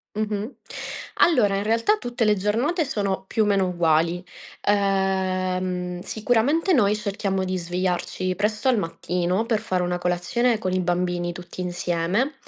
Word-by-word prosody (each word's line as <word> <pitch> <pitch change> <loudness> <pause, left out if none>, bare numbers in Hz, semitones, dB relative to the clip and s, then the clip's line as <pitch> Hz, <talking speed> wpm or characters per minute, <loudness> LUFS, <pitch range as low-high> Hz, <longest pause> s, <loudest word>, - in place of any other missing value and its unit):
Mh-mh. 215 +2 -2 0.7
Allora, 235 - +4
in 200 - -1
realtà 230 - +2
tutte 240 - -2
le 210 0 +4
giornate 235 - +1
sono, 200 -8 -2
più 220 - +1
o - - +1
meno, 195 -2 +2
uguali. 170 0 +1 0.4
Ehm, 185 -2 0
sicuramente 245 - +1
noi 210 -6 +4
cerchiamo 195 -2 -2
di 185 0 -1
svegliarci 180 +1 -2
presto 210 +4 -1
al 255 - +4
mattino 180 +2 -1
per 225 -2 +1
fare 185 -1 -1
una 180 0 -1
colazione 180 +8 +1
con 185 -3 -2
i 185 - +1
bambini, 175 0 0
tutti 180 +1 -8
insieme; 180 - 0
190 Hz, 145 wpm, -24 LUFS, 180-220 Hz, 0.7 s, Allora